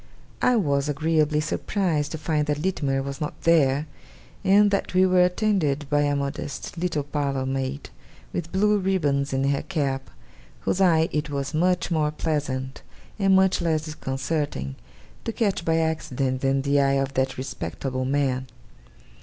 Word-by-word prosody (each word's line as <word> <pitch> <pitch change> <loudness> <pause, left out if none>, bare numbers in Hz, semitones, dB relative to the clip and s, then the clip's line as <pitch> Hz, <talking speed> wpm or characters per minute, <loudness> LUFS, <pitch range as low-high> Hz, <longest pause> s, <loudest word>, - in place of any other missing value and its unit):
I 250 - +4
was 145 -8 +1
agreeably 155 0 +1
surprised 155 -2 -1
to - - -3
find 155 -1 -1
that 150 -1 0
Littimer 145 -5 -1
was 140 +1 -6
not 150 - -4
there, 150 -3 +3 0.6
and 205 +1 +5
that 200 -2 -1
we 185 +1 +6
were 185 -1 +4
attended 180 -7 +1
by 145 0 +3
a 145 0 +1
modest 140 +1 -4
little 170 -4 -1
parlour 140 -2 -2
maid, 135 +1 -3 0.4
with 170 -1 -4
blue 210 +2 +3
ribbons 145 -8 0
in 135 0 0
her 140 - 0
cap, 140 -7 -2 0.5
whose 190 - 0
eye 165 -3 +4
it 150 0 -2
was 140 -1 -3
much 180 +2 +1
more 155 -2 +2
pleasant, 145 -4 -3 0.4
and 195 -1 +4
much 190 -1 +3
less 160 -2 0
disconcerting, 135 - -3 0.5
to - - -2
catch 205 -6 0
by 165 -1 +2
accident, 135 -5 -1
than 135 0 +1
the 140 0 +2
eye 135 0 +3
of 135 0 0
that 130 0 0
respectable 130 - -4
man. 130 -1 0
150 Hz, 155 wpm, -25 LUFS, 135-170 Hz, 0.6 s, we